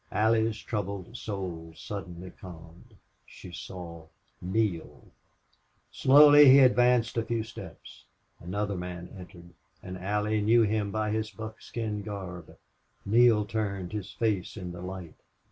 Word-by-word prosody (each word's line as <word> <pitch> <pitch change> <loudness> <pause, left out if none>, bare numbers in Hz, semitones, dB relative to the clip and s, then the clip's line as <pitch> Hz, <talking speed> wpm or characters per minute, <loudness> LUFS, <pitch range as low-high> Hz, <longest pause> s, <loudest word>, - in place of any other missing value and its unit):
Allie's 110 0 +2
troubled 100 0 -5
soul 90 -8 -6
suddenly 95 -3 -7
calmed. 85 -2 -13 0.3
She 90 - -13
saw 85 -1 -9 0.3
Neale. 95 -2 -2 0.8
Slowly 145 +1 +7
he 135 - +9
advanced 125 -3 +4
a 115 - +1
few 115 -1 -2
steps. 110 - -12 0.3
Another 100 +3 -3
man 90 -1 -6
entered, 90 -2 -12 0.3
and 95 -1 -7
Allie 105 +3 0
knew 115 +3 +4
him 105 -1 0
by 110 +1 -1
his 110 0 -1
buckskin 110 0 -6
garb. 95 -5 -8 0.5
Neale 110 0 +4
turned, 100 -4 -3
his 105 -2 -5
face 105 -4 -2
in 90 -3 -6
the 90 0 -9
light. 90 -3 -7
100 Hz, 125 wpm, -28 LUFS, 90-110 Hz, 0.8 s, he